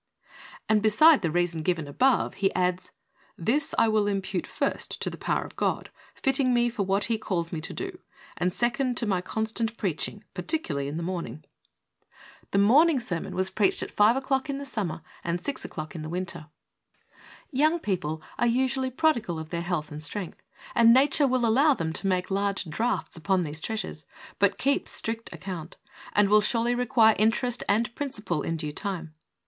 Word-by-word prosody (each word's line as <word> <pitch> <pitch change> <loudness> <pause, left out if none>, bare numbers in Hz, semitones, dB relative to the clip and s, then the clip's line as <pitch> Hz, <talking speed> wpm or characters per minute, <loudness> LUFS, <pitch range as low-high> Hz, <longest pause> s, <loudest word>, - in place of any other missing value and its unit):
And 215 -1 +3
beside 270 +9 +6
the 170 - 0
reason 175 0 0
given 165 -2 -1
above 255 - +2
he 195 - +3
adds: 180 0 0 0.5
"This 265 - 0
I - - +5
will 215 -1 +2
impute, 195 -2 -2
first, - - -2
to - - -1
the - - -7
power - - -1
of - - -12
God, - - -1 0.2
fitting 270 -2 +2
me 240 0 +2
for 230 -3 -3
what 195 +1 +1
He 230 -2 0
calls 170 -5 -2
me 160 - -3
to 165 - -6
do, 375 -1 -6 0.4
and, 180 +1 0
second, 245 +4 0
to 235 - 0
my 190 -4 0
constant 220 +3 -2
preaching, 200 +2 -3
particularly 180 - -2
in 145 +3 -4
the 170 - -3
morning." 170 -3 -5 1.0
The - - 0
morning 285 +11 +5
HEALTH. 245 -3 -2
71 170 -2 -1
sermon 190 - -7
was 185 +1 +1
preached 200 -3 +2
at - - -7
5 210 +3 +4
o'clock 270 0 -1
in 275 - -2
the 280 - -6
Sum 220 -8 -2
mer 165 - -6 0.2
and 170 +1 -1
6 280 +9 -4
o'clock 155 0 -6
in 165 - -6
the 155 - -6
Winter. 170 -3 -4 1.0
Young 310 +5 +3
people 165 - -2 0.2
are 240 - +3
usually 260 +2 +1
prodigal 240 - +1
of 160 0 -7
their 170 0 -3
health 170 -4 -3
and 150 +1 -7
strength, 190 +1 -5 0.3
and 230 0 +6
nature 280 +2 +4
will 255 -2 +1
allow 270 +6 +4
them 160 -5 -3
to 195 - -3
make 185 0 0
large 200 0 0
drafts 190 +4 -2
upon 185 +2 +1
these 155 0 -5
treasures, 220 -1 -4 0.3
but - - +3
keeps 280 +1 +1
strict 225 0 -2
account, 175 -4 -7 0.4
and 205 -1 +4
will 210 +1 +5
surely 230 +3 +2
require 230 -2 +4
interest 235 +3 +1
and 220 +3 +2
principal 215 - -2
in 165 +2 -2
due 150 -2 -4
time. 170 -4 -5
205 Hz, 190 wpm, -27 LUFS, 175-245 Hz, 1.0 s, beside